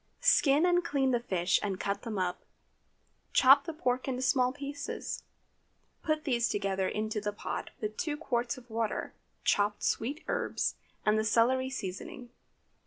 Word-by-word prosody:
Skin 290 +2 +5
and 355 0 +3
clean 275 -5 +1
the 240 - +2
fish 185 -5 +1
and 195 -3 -2
cut 200 +1 -2
them 225 -4 -4
up. 180 -1 -2 0.9
Chop 275 +2 +7
the - - -3
pork 255 -4 -1
into 260 -1 -2
small 255 -1 +3
pieces. 285 +1 -5 0.8
Put 310 -1 0
these 240 -4 +1
together 195 -2 0
into 215 0 -2
the 205 0 -1
pot, 205 - -5
with 215 0 -4
two 300 -4 -2
quarts 245 -6 -1
of 250 -1 -13
water, 225 -1 -2 0.3
chopped 205 0 +1
sweet 280 +7 -1
herbs, - - 0 0.3
and 215 +1 +4
the - - +1
celery 245 +4 +3
seasoning. 235 +1 -6
240 Hz, 155 wpm, -31 LUFS, 210-275 Hz, 0.9 s, Chop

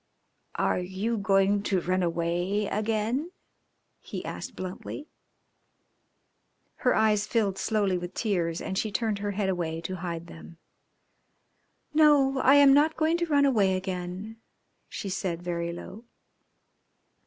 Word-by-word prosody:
"Are - - +1
you 190 +6 -2
going 200 -1 +2
to 195 -2 0
run 185 +2 0
away 175 +4 0
again?" 220 - -1 0.7
he - - -7
asked - - -6
bluntly. 185 +10 -6 1.7
Her 250 - +2
eyes 215 -1 +2
filled 200 -5 0
slowly 200 -3 +1
with 175 +1 -7
tears, 175 -7 -1
and 190 - -2
she 215 - -2
turned 215 0 -1
her 205 0 -2
head 200 0 -1
away 170 -3 -2
to 185 +3 -5
hide 170 -2 -5
them. 165 0 -12 1.4
"No, 290 -3 +5
I 270 +2 +6
am 285 -1 +7
not 300 +3 +3
going 320 +2 +2
to 345 0 -1
run 285 -2 +4
away 200 -8 +3
again," 185 +3 -5 0.5
she - - -5
said 185 -2 -3
very 170 -1 -2
low. 190 +5 -9
200 Hz, 130 wpm, -27 LUFS, 180-225 Hz, 1.7 s, am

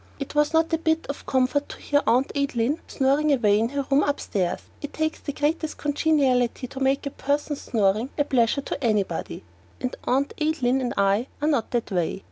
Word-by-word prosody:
It 275 - -5
was 295 0 +2
not 325 +1 +2
a 325 - +2
bit 320 0 +1
of 280 - -6
comfort 260 +2 +1
to - - -8
hear 290 0 +1
Aunt 255 +3 +3
Adeline 280 0 0
snoring 280 +3 +2
away 215 -6 +3
in 225 +1 +1
her 280 0 -2
room 275 +1 +5
upstairs. 200 -11 -1 0.2
It 290 - -6
takes 315 0 -1
the 285 - -4
greatest 305 +2 -1
congeniality 275 -5 +1
to 265 - -7
make 270 +1 +1
a 280 - -3
person's 290 +1 -2
snoring 215 +1 +1
a 290 - +3
pleasure 260 -1 +2
to 280 - -5
anybody, 205 -7 -1 0.4
and 255 0 -3
Aunt 275 +3 +1
Adeline 270 -4 +1
and 245 - -2
I 200 +5 +2
are 295 - 0
not 285 -7 +1
that 235 -3 -2
way. 180 0 -1
275 Hz, 195 wpm, -24 LUFS, 240-295 Hz, 0.4 s, room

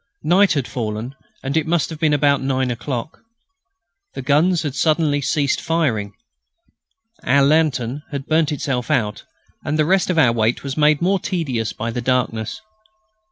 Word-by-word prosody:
Night 185 +5 +4
had 140 -5 -1
fallen, 110 +1 -4 0.3
and 135 +2 -3
it 160 0 +1
must 170 -1 0
have 160 - -7
been 155 -2 +2
about 145 -1 +2
nine 130 -1 0
o'clock. 125 +4 -5 0.9
The 135 - -5
guns 160 +6 +2
had 145 -4 -3
suddenly 150 -1 +1
ceased 140 +2 0
firing. 125 -12 -1 1.1
Our 140 +2 +3
lantern 140 -3 +1
had 140 -2 -5
burnt 160 0 +1
itself 135 -4 -2
out, 110 -8 -1 0.4
and 155 - -1
the 155 - +2
rest 190 +3 +2
of 180 - 0
our 130 -7 +5
wait 115 0 0
was 135 -1 -4
made 150 +1 +3
more 190 +2 +2
tedious 145 - -2
by 115 +1 -4
darkness. 120 -2 -1
140 Hz, 160 wpm, -20 LUFS, 125-160 Hz, 1.1 s, our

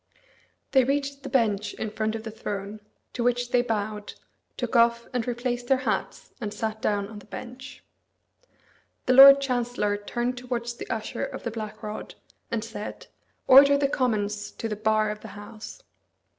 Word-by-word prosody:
They 265 -1 +5
reached 280 +1 -1
the - - -7
bench 210 -5 +1
in 220 - -4
front 220 +1 -1
of 220 - -5
the 225 - -6
throne, 205 -1 -5 0.3
to 240 - -2
which 245 0 0
they 245 - +4
bowed, 210 -3 -3 0.4
took - - -3
off 235 0 +4
and 245 -2 -1
replaced 245 0 -2
their 270 - +4
hats, - - -2
and 210 -2 -3
sat 220 0 -4
down 200 -1 0
on 210 0 -9
the 205 - -17
bench. 255 +4 -9 1.2
The 255 - +3
Lord 275 +1 +11
Chancellor 245 -6 -1
turned 240 +4 -3
towards 240 -1 -3
the - - -9
Usher 220 -2 -3
of 270 -1 -5
the 235 - -3
Black 220 0 -7
Rod, 210 0 -6 0.3
and 225 -2 -2
said, 220 -2 -7 0.4
"Order 280 +2 +8
the 280 0 +2
Commons 210 -6 -1
to 225 - -4
the 215 - -3
bar 215 0 +1
of 210 - -6
the 220 - -10
House." 215 - -10
230 Hz, 170 wpm, -26 LUFS, 215-250 Hz, 1.2 s, Lord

